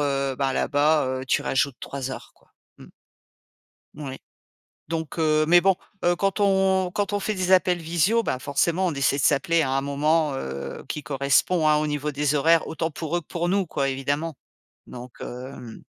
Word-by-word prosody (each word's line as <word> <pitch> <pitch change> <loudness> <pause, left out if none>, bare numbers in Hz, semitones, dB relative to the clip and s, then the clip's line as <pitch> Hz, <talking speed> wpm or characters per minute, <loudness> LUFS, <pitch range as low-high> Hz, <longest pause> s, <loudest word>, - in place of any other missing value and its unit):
heu, 140 -2 0
bah, 135 -1 0
là-bas, 145 -3 +1
tu - - +2
rajoutes 135 -1 0
3 135 -1 -5
heures - - -8
quoi, - - -30 0.3
mmh. - - -13 1.1
Moui. 140 -3 -7 0.7
Donc 165 -1 -4
heu 155 -1 +2
mais 175 +1 +6
bon, 195 +1 +4 0.3
heu, 175 0 +3
quand 195 +2 -1
on 190 -2 +2
quand 205 0 -1
on 205 - 0
fait 215 +2 -2
des 185 0 0
appels 180 -1 +4
visio, 175 +8 +1
bah, 130 - -2
forcément, 165 +7 0
on 170 - 0
essaie 140 0 +1
de 140 - -1
s'appeler 160 +5 +3
à 130 - -1
un 135 - +1
moment, 150 +2 +1
heu, 70 - -6
qui 150 - -4
correspond 140 +5 +1
hein, 150 - +4
au 150 0 0
niveau 150 0 -2
des 145 +1 0
horaires 165 +3 +3
autant 160 0 -3
pour 160 +2 -3
eux - - 0
que 160 - -22
pour 175 0 -2
nous, 190 0 +1
quoi, 140 -3 -1
évidemment. 145 +4 -2 0.5
Donc 125 0 -10
hem 125 -2 -8
150 Hz, 190 wpm, -24 LUFS, 135-175 Hz, 1.1 s, mais